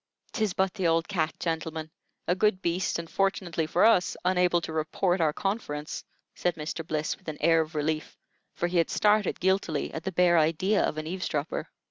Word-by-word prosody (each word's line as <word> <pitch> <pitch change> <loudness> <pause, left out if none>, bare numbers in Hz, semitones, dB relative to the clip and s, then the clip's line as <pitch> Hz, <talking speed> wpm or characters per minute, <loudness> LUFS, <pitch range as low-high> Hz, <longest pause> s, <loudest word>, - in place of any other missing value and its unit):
"'Tis 215 -6 0
but 190 -1 +1
the 190 -5 0
old 165 0 +2
cat, 160 -6 0
gentlemen. 160 -1 -3 0.4
A - - +3
good 190 +1 +2
beast, 175 0 0
and, 170 0 -5
fortunately 180 -4 0
for 175 +5 +3
us, 205 -5 +4
unable 180 -1 +3
to 160 - -5
report 175 +4 0
our 155 -2 +3
conference," 150 -5 -3 0.3
said 175 - -1
Mr. 160 +1 -4
Bliss, 155 -1 -2
with 190 - -27
an 155 -1 -4
air 165 +1 +4
of 160 +1 -6
relief, 155 +1 -2 0.4
for - - -1
he 175 0 +1
had 165 - +2
started 210 -2 +2
guiltily 185 -5 0
at 160 - -5
the 190 - -2
bare 175 -1 +4
idea 165 +7 +2
of - - -1
an 155 - -3
eavesdropper. 165 -3 -3
170 Hz, 190 wpm, -28 LUFS, 160-185 Hz, 0.4 s, us